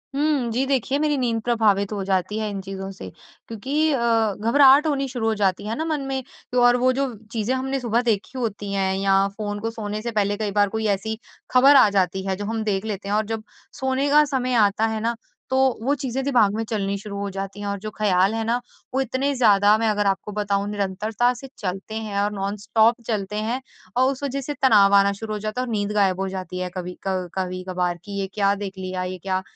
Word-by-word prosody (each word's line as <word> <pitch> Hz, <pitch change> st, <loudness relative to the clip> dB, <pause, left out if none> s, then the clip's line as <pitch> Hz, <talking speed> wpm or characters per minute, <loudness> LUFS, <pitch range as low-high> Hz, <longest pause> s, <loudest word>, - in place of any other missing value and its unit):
हुँ, 285 Hz, -4 st, +1 dB
जी 250 Hz, +4 st, 0 dB
देखिए 270 Hz, 0 st, 0 dB
मेरी 300 Hz, -1 st, +1 dB
नींद 235 Hz, -3 st, 0 dB
प्रभावित 215 Hz, -4 st, +2 dB
हो 200 Hz, -2 st, -3 dB
जाती 190 Hz, +1 st, 0 dB
है 215 Hz, -1 st, -2 dB
इन 200 Hz, -1 st, -4 dB
चीज़ों 195 Hz, 0 st, -6 dB
से, 95 Hz, -, -9 dB, 0.4 s
क्योंकि 280 Hz, +8 st, 0 dB
अ, 275 Hz, -, +1 dB, 0.4 s
घबराहट 275 Hz, +6 st, +6 dB
होनी 275 Hz, -2 st, 0 dB
शुरू 245 Hz, -3 st, -2 dB
हो 225 Hz, -, +2 dB
जाती 195 Hz, -1 st, 0 dB
है 225 Hz, -, -2 dB
ना 320 Hz, -, -2 dB
मन 310 Hz, -3 st, -1 dB
में 265 Hz, -1 st, -2 dB, 0.3 s
तो 250 Hz, 0 st, +2 dB
और 245 Hz, 0 st, +5 dB
वो 255 Hz, -, +5 dB
जो 270 Hz, -1 st, -1 dB, 0.2 s
चीज़ें 225 Hz, +2 st, -1 dB
हमने 265 Hz, +1 st, -2 dB
सुबह 235 Hz, -1 st, +1 dB
देखी 235 Hz, +2 st, -1 dB
होती 205 Hz, -4 st, -3 dB
हैं 190 Hz, -1 st, +1 dB
या 195 Hz, 0 st, +3 dB
फ़ोन 205 Hz, -1 st, -3 dB
को 225 Hz, +2 st, -2 dB
सोने 215 Hz, -1 st, -4 dB
से 235 Hz, +1 st, -3 dB
पहले 205 Hz, -2 st, 0 dB
कई 210 Hz, -1 st, -2 dB
बार 205 Hz, 0 st, +2 dB
कोई 220 Hz, +1 st, -3 dB
ऐसी 220 Hz, +3 st, -5 dB, 0.3 s
खबर 270 Hz, +3 st, +7 dB
आ 215 Hz, -, +7 dB
जाती 190 Hz, -1 st, 0 dB
है 190 Hz, -, 0 dB
जो 205 Hz, +2 st, -5 dB
हम 225 Hz, +1 st, -2 dB
देख 205 Hz, -1 st, -1 dB
लेते 200 Hz, -2 st, -4 dB
हैं 205 Hz, -, +1 dB
और 215 Hz, +1 st, +1 dB
जब 220 Hz, 0 st, -4 dB, 0.4 s
सोने 265 Hz, +2 st, 0 dB
का 300 Hz, +1 st, +6 dB
समय 260 Hz, -3 st, -1 dB
आता 215 Hz, -1 st, +3 dB
है 220 Hz, 0 st, -2 dB
ना, 230 Hz, +1 st, 0 dB, 0.3 s
तो 260 Hz, -, +1 dB, 0.2 s
वो 270 Hz, +5 st, +1 dB
चीज़ें 265 Hz, -1 st, -3 dB
दिमाग 240 Hz, -7 st, +3 dB
में 225 Hz, -, -1 dB
चलनी 200 Hz, -2 st, -1 dB
शुरू 200 Hz, 0 st, -7 dB
हो 200 Hz, 0 st, -3 dB
जाती 195 Hz, +1 st, -6 dB
हैं 205 Hz, -, -4 dB
और 200 Hz, 0 st, -2 dB
जो 215 Hz, +2 st, -5 dB
ख़्याल 195 Hz, -1 st, +3 dB
है 225 Hz, -, -1 dB
ना 235 Hz, +2 st, +1 dB, 0.3 s
वो 265 Hz, -, +2 dB
इतने 265 Hz, +3 st, -1 dB
ज़्यादा 210 Hz, -3 st, +5 dB
मैं 225 Hz, 0 st, 0 dB
अगर 210 Hz, -1 st, +1 dB
आपको 195 Hz, +1 st, -1 dB
बताऊँ 200 Hz, -1 st, -1 dB
निरंतरता 210 Hz, +4 st, 0 dB
से 250 Hz, +2 st, -10 dB
चलते 195 Hz, +2 st, -5 dB
हैं 215 Hz, -2 st, -3 dB
और 205 Hz, +1 st, 0 dB
नॉनस्टॉप 210 Hz, +3 st, +1 dB
चलते 210 Hz, -2 st, -2 dB
हैं 225 Hz, +5 st, -2 dB, 0.4 s
और 260 Hz, +1 st, +4 dB
उस 275 Hz, +1 st, -7 dB
वजह 275 Hz, 0 st, -2 dB
से 290 Hz, +2 st, -4 dB
तनाव 205 Hz, -6 st, +6 dB
आना 200 Hz, 0 st, +5 dB
शुरू 220 Hz, -1 st, -4 dB
हो 210 Hz, -, -3 dB
जाता 215 Hz, +4 st, -3 dB
है -, -, -2 dB
और -, -, -4 dB
नींद 205 Hz, -1 st, -1 dB
गायब 195 Hz, -3 st, +2 dB
हो 195 Hz, -, -1 dB
जाती 185 Hz, -1 st, -5 dB
है 185 Hz, 0 st, -2 dB
कभी 180 Hz, -1 st, -5 dB
क 185 Hz, -2 st, -1 dB
कभी-कभार 185 Hz, -1 st, -2 dB
कि 200 Hz, -1 st, -5 dB
ये 195 Hz, -, -2 dB
क्या 200 Hz, -1 st, +2 dB
देख 200 Hz, -1 st, -5 dB
लिया? 185 Hz, -1 st, -4 dB
ये 185 Hz, 0 st, -4 dB
क्या 185 Hz, +1 st, -2 dB
215 Hz, 235 wpm, -23 LUFS, 195-245 Hz, 0.4 s, खबर